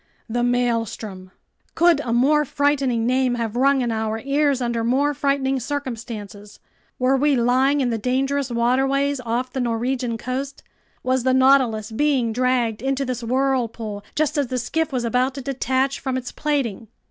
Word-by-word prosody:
The 240 +1 -1
Maelstrom! 230 -6 -1 0.5
Could 340 -2 +4
a 250 -5 -3
more 280 +6 +3
frightening 275 -5 0
name 255 0 +2
have 230 -2 -3
rung 270 +2 +3
in 240 -2 -1
our 220 0 -2
ears 280 +1 +1
under 235 -2 -1
more 275 +5 +2
frightening 270 -1 0
circumstances? 230 -6 -6 0.4
Were 255 +1 +2
we 285 +1 +3
lying 260 +4 +2
in 250 -2 0
the 225 - -1
dangerous 270 +3 0
waterways 270 +4 +1
off 240 +2 -2
the 265 - -2
Norwegian 245 0 -1
coast? 265 +4 -5 0.4
Was 255 0 +1
the 260 +1 +2
Nautilus 260 -5 +3
being 255 -2 +1
dragged 245 -3 0
into 270 +1 -1
this 250 -1 -3
whirlpool 235 -4 -1
just 300 0 +1
as 280 - 0
the 255 - -3
skiff 320 +6 -1
was 250 -3 -1
about 250 +3 +1
to 275 - -5
detach 265 +1 -1
from 265 -1 -2
its 255 -1 -5
plating? 265 -8 -2
255 Hz, 160 wpm, -22 LUFS, 235-275 Hz, 0.5 s, Could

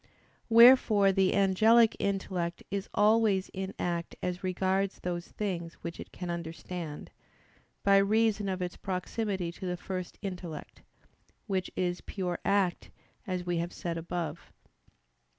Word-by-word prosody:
Wherefore 230 -4 +7
the 190 -1 +2
angelic 220 +4 +5
intellect 185 -3 -2
is 200 0 -3
always 210 -2 +3
in 190 0 -5
act 170 -1 -2
as 180 0 -3
regards 190 +1 0
those 175 -1 -3
things 175 -5 -4
which 170 0 -6
it - - -9
can 180 -1 -5
understand, 165 -1 -6 0.7
by 200 0 +6
reason 210 0 +2
of 185 -1 -2
its 175 - -5
proximity 190 -1 -2
to 185 +2 -7
the 180 0 -2
first 185 -1 -5
intellect, 180 -5 -6 0.6
which 190 -3 -1
is 180 -1 -1
pure 180 -3 -3
act, 195 -3 +1 0.4
as 180 -2 -2
we 175 -1 0
have 170 +1 -2
said 170 -1 -4
above. 165 -1 -5
185 Hz, 135 wpm, -30 LUFS, 175-200 Hz, 0.7 s, Wherefore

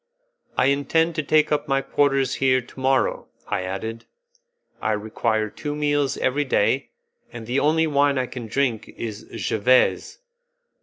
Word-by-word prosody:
"I - - +3
intend 145 +5 +2
to 155 - -1
take 155 +1 +2
up 145 -1 0
my 135 -1 +1
quarters 135 -2 +1
here 130 -1 +4
to 125 +1 -13
morrow," 130 0 +1 0.2
I - - -1
added; 105 +5 -5 0.8
"I 110 - +1
require 110 +1 -1
two 145 -1 -5
meals 145 -2 0
every 140 +3 +1
day, 130 0 +1 0.4
and 115 -2 -8
the 125 +4 0
only 160 +2 +3
wine 145 -2 +2
I 130 - +1
can 125 -2 -7
drink 115 -2 -1
is 110 -3 -6
jevese. 125 +4 +2
135 Hz, 150 wpm, -23 LUFS, 115-145 Hz, 0.8 s, here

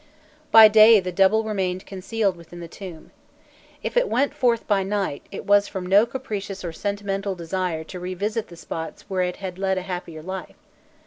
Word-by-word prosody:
By 220 0 +10
day 215 +1 +7
the 180 -1 -4
double 195 +4 +3
remained 190 -4 -2
concealed 195 +1 -2
within 170 0 -12
the 170 - -7
tomb. 175 -2 -10 0.7
If - - -4
it - - +3
went 280 +3 +1
forth 235 -2 +1
by 205 -2 +2
night, 195 -6 -2
it 195 - -7
was 205 0 +4
from 190 -3 -5
no 200 +5 +5
capricious 205 -7 -5
or 170 - -4
sentimental 200 +1 -3
desire 170 -1 -3
to 180 +3 -9
revisit 200 +5 -3
the 170 - -13
spots 160 0 -7
where 190 -2 -1
it 180 0 -1
had 190 -2 -7
led 190 -1 0
a 185 - -2
happier 175 -4 -6
life. 190 +2 -7
195 Hz, 185 wpm, -23 LUFS, 180-210 Hz, 0.7 s, By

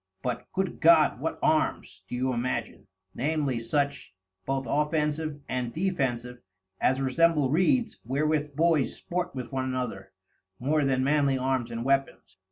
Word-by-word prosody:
But, 125 -1 -4
good 190 -1 -2
God, 160 -2 +5
what - - -2
Arms, - - 0
do - - -5
you 130 +1 0
imagin? 120 +1 -3 0.3
Namely 145 -3 -1
such, 140 -2 -2 0.3
both 135 0 -1
Offensive 150 +1 0
and 125 -2 -2
Defensive, 125 -9 -2 0.4
as 130 +1 +2
resemble 140 +1 +2
Reeds 230 - +2
wherewith 145 +3 0
Boys 160 -3 +2
sport 180 -1 -4
with 130 +1 -5
one 130 -1 -1
another, 125 -7 -4 0.5
more 150 +6 +1
than 130 -1 +1
Manly 140 -1 +2
Arms 130 -2 -1
and 115 0 -4
Weapons. 135 -8 -1
135 Hz, 140 wpm, -27 LUFS, 125-155 Hz, 0.5 s, God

